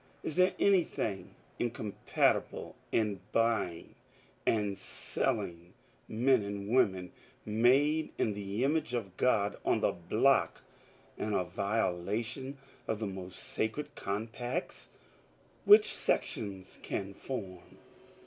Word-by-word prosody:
Is 160 - -3
there 185 +1 +4
anything 170 - +1 0.2
incompatible 110 -4 0 0.2
in 105 -4 +1
buying 115 -7 0 0.5
and 105 -3 +2
selling 85 -2 -3 0.3
men 125 +3 +3
and 100 0 -5
women 95 -7 +2 0.3
made 135 +8 +3
in 105 - +1
the 100 +3 -3
image 145 -2 +1
of 100 -6 -4
God 105 -4 +2
on - - +2
the - - +3
block 110 +10 +2 0.6
and 105 -1 -1
a 90 - +2
violation 105 +7 -2 0.3
of 110 - 0
the 110 - -3
most 95 -2 -6
sacred 110 +7 -3
com 100 +3 -3
pacts 120 +8 -5 0.8
which 425 +2 +8
sections 95 -3 -2
can 100 0 -4
form? 95 -6 -7
110 Hz, 110 wpm, -32 LUFS, 100-125 Hz, 0.8 s, which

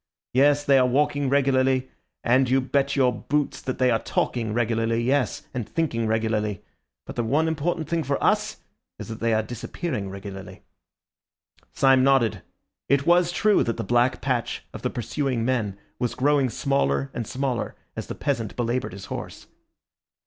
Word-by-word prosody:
Yes, 145 +3 +4
they 140 -2 +5
are 125 - +4
walking 145 +1 +1
regularly; 130 -1 +2 0.3
and 125 +2 +3
you 130 +1 +4
bet 140 +1 0
your 130 -3 +3
boots 150 0 -2
that 130 - -4
they 130 -1 +3
are 115 - +2
talking 115 -3 -1
regularly, 115 0 0
yes, 135 +1 0
and 120 -5 -4
thinking 115 -9 -1
regularly. 110 -3 -1 0.4
But - - -9
the 120 - +1
one 150 +8 +1
important 160 0 -1
thing 170 -1 0
for 140 0 0
us - - +1 0.4
is - - -8
that 110 - -6
they 115 0 +1
are 110 0 +2
disappearing 115 - -4
regularly." 95 -1 -9 1.1
Syme 135 -1 +4
nodded. 135 -6 +3 0.5
It 140 0 +3
was 175 0 +4
true 210 +3 +3
that 115 - -2
the - - -2
black 120 +2 +2
patch 125 -4 -1
of - - -7
the - - -1
pursuing 125 0 -2
men 110 -6 -1 0.2
was 120 - -1
growing 140 0 +2
smaller 70 - 0
and 115 -3 -4
smaller 130 -3 -2 0.2
as - - -5
the - - -5
peasant 115 -3 -2
belaboured 120 -2 -1
his 100 0 -8
horse. - - -7
130 Hz, 165 wpm, -25 LUFS, 115-140 Hz, 1.1 s, they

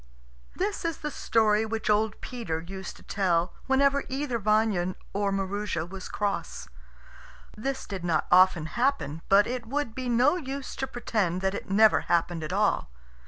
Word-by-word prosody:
This 400 +2 -2
is 335 -1 -1
the 300 - -4
story 220 -4 +2
which 220 0 -3
old 215 0 +2
Peter 225 -11 -4
used 190 +2 -7
to - - -16
tell 175 -3 0
whenever 280 +1 +3
either 265 -3 -2
Vanya 210 -4 +1 0.2
or 200 0 0
Maroosia 195 -3 -2
was 190 +1 -8
cross. 205 -1 -3 0.9
This 265 +5 -3
did 190 -4 -6
not 165 -3 +1
often 185 -3 +5
happen; 235 - -1
but 200 +1 +6
it 245 -1 -4
would 280 -2 -2
be 255 0 -4
no 250 +8 +4
use 275 -4 -5
to 265 - -2
pretend 210 -8 -1
that 190 0 0
it - - -6
never 215 +2 +5
happened 170 -1 0
at 155 - -4
all. 200 - +1
210 Hz, 165 wpm, -27 LUFS, 185-255 Hz, 0.9 s, but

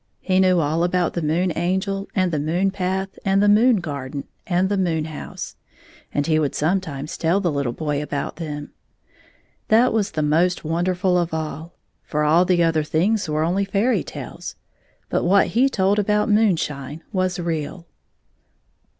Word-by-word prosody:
He 185 -1 +1
knew 185 -2 +4
all 160 +2 +1
about 175 0 +1
the 170 - -2
Moon 165 +3 0
Angel 190 +3 -1
and 185 -3 +2
the 155 - 0
moon 175 +6 0
path 190 0 -3
and 195 0 +2
the 205 - +4
moon 225 +4 +5
garden 140 -6 -4 0.2
and 185 -1 +2
the 200 - 0
moon 165 -5 0
house, 155 -2 -7 0.5
and 145 - 0
he 155 -1 +2
would 145 -3 -1
sometimes 155 -3 -1
tell 170 +4 +1
the 180 -4 0
httle 140 -5 -2
boy 150 -2 -2
about 145 0 -4
them. 150 -3 -6 1.0
That 230 +3 +4
was 210 -3 +1
the 155 -4 -2
most 170 +4 +2
wonderfiil 180 +3 +1
of 165 -1 -3
all, 160 +1 -5 0.3
for 150 0 -2
all 160 +4 +4
the 175 -1 +3
other 165 -1 +2
things 180 +6 0
were 155 +1 0
only 180 +5 +1
fairy 200 +6 +1
tales, - - -8 0.5
but - - 0
what 195 +3 +4
he 255 +5 +3
told 200 -3 +1
about 210 +1 +1
moonshine 165 -9 0
was 185 -1 0
real. 170 +1 -3
175 Hz, 165 wpm, -22 LUFS, 155-195 Hz, 1.0 s, moon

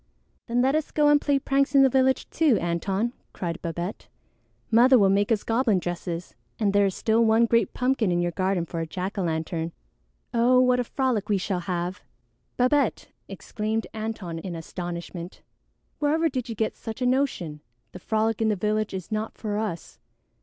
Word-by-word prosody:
"Then 245 +1 +1
let 265 +1 +3
us 310 0 0
go 295 -1 +3
and 295 0 +5
play 285 -1 +2
pranks 275 0 +1
in 275 - +8
the - - +7
village 265 0 +2
too, 305 -9 +3
Antone," 190 +7 -1 0.2
cried 170 -2 -4
Babette. 170 +3 -5 0.6
"Mother 250 +3 +6
will 195 -3 +4
make 200 +3 +2
us 215 -2 +2
goblin 225 -3 +2
dresses, 175 -1 -4 0.2
and 205 -3 +1
there 200 0 +4
is 190 - -3
still 225 +1 +2
one 225 +1 +4
great 230 0 +1
pumpkin 250 -6 +1
in 175 - +1
your 175 0 0
garden 185 -1 0
for 165 0 -5
a 165 - -3
jack 185 +4 -4
o' - - +1
lantern. 165 0 -2 0.6
Oh, 245 +2 +4
what 250 0 +4
a - - +2
frolic 240 -5 -1
we 205 - +3
shall 185 0 -2
have!" 175 +1 -3 0.6
"Babette!" 265 +3 +1 0.2
exclaimed 220 +1 -3
Antone 215 -6 -4
in 175 0 -6
astonishment. 170 +1 -7 0.6
"Wherever 315 +2 +2
did 255 -4 -4
you 225 - -4
get 220 +1 -1
such 225 +2 -6
a - - +1
notion? 245 - 0 0.3
The 180 - -9
frolic 220 +3 0
in 220 - +3
the 210 - +2
village 210 +1 -1
is 185 0 -7
not 215 +1 -3
for 210 -2 -2
us. 205 -7 -5
215 Hz, 185 wpm, -25 LUFS, 180-250 Hz, 0.6 s, in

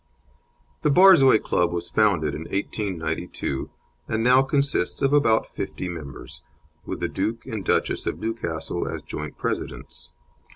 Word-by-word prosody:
The 150 - +2
Borzoi 145 - +7
Club 90 - +1
was 85 -1 -3
founded 90 -9 +2
in 80 +3 -6
1892, 95 -8 -3 0.4
and 110 0 -1
now 125 +2 +6
consists 140 -5 0
of 135 +1 +3
about 115 -7 +3
fifty 95 - -4
members, 80 -6 -8 0.5
with - - -4
the - - +1
Duke 115 +1 -3
and 110 -3 -5
Duchess - - 0
of - - -2
Newcastle 110 -8 -3
as - - -5
joint 75 0 -6
presidents. - - -5
110 Hz, 135 wpm, -24 LUFS, 85-130 Hz, 0.5 s, Borzoi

